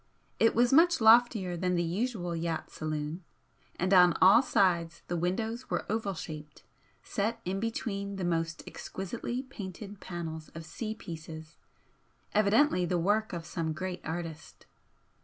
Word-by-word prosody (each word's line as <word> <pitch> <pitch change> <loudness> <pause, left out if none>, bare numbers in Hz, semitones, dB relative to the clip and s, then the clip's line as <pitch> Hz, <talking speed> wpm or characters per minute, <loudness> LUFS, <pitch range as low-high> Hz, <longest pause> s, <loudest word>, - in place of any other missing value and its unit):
It 225 - +4
was 240 +2 +4
much 335 +3 +6
loftier 220 -5 +5
than 180 +1 0
the 175 - +1
usual 175 0 -2
yacht 165 -1 -3
saloon, 155 +2 -4 0.5
and 185 +2 0
on 180 -2 +7
all 195 +6 +8
sides 170 -9 +1
the 175 - -2
windows 220 +8 -2
were - - -1
oval 215 -3 -1
shaped, 155 -2 -8 0.4
set 220 +3 -2
in 190 +2 -1
between 200 -3 -3
the 190 - -4
most 165 -1 -1
exquisitely 235 +6 -5
painted 205 -5 -8
panels 160 -3 -6
of 165 -1 -7
sea 215 +6 -5
pieces, 160 -4 -9 0.8
evidently 215 0 +4
the 175 0 0
work 210 +5 +1
of 170 -2 -5
some 165 -2 -2
great 180 +2 -4
artist. 160 -1 -6
185 Hz, 140 wpm, -30 LUFS, 165-220 Hz, 0.8 s, all